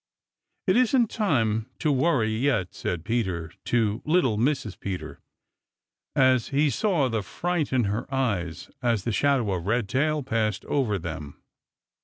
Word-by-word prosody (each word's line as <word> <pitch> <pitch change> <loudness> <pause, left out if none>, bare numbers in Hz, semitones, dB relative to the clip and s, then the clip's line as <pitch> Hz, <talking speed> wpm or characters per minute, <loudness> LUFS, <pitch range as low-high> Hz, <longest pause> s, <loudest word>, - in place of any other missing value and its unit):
"It - - +3
isn't 250 -2 +3
time 115 - +1
to 155 - +1
worry 130 -5 +2
yet," 110 -5 0
said 85 -1 -4
Peter 95 -8 -1
to 110 -3 +1
little 155 -8 +2
Mrs. 115 -3 -1
Peter, 95 -2 -5 1.0
as 130 -3 +4
he 145 +1 +2
saw 170 - +1
the 115 -3 -1
fright 170 - -2
in 130 -2 +2
her 105 +6 -2
eyes 100 -11 -2
as 115 -5 +1
the 120 - -1
shadow 125 -1 +2
of 90 0 -4
Redtail 130 +7 +1
passed 110 -4 -1
over 120 -8 0
them. 80 -5 -7
120 Hz, 140 wpm, -26 LUFS, 100-140 Hz, 1.0 s, as